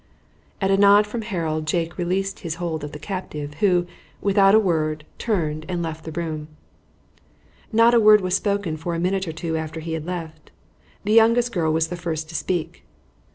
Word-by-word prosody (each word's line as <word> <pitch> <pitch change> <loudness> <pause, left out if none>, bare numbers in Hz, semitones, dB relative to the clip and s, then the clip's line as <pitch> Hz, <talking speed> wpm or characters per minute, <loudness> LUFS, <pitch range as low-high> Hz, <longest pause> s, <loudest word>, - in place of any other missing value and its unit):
At 195 -1 +1
a 195 - +4
nod 205 +1 +6
from 225 +3 -5
Harold 165 -7 -3
Jake 165 +2 -1
released 190 +3 -1
his 165 -2 -4
hold 165 -3 -4
of 145 - -5
the 150 - -7
captive, 150 -4 -6
who, 180 -3 +3 0.3
without 195 0 +4
a - - +7
word, 155 -6 0
turned 155 -9 -1
and 175 -2 -2
left 160 -1 -6
the 160 - -5
room. 160 -2 -4 1.2
Not 230 +1 +5
a 235 - +6
word 215 -1 +7
was 185 -2 0
spoken 200 -6 -1
for 170 +2 -3
a - - -2
minute 190 +1 0
or - - -2
two 160 0 -4
after 160 0 -5
he 160 0 -5
had 160 0 -4
left. 160 -4 -6 0.5
The 210 +1 0
youngest 230 +2 +5
girl 165 -6 0
was 160 0 +1
the 175 - -4
first 160 -3 -4
to - - -10
speak. 175 -2 -3
175 Hz, 195 wpm, -23 LUFS, 160-200 Hz, 1.2 s, a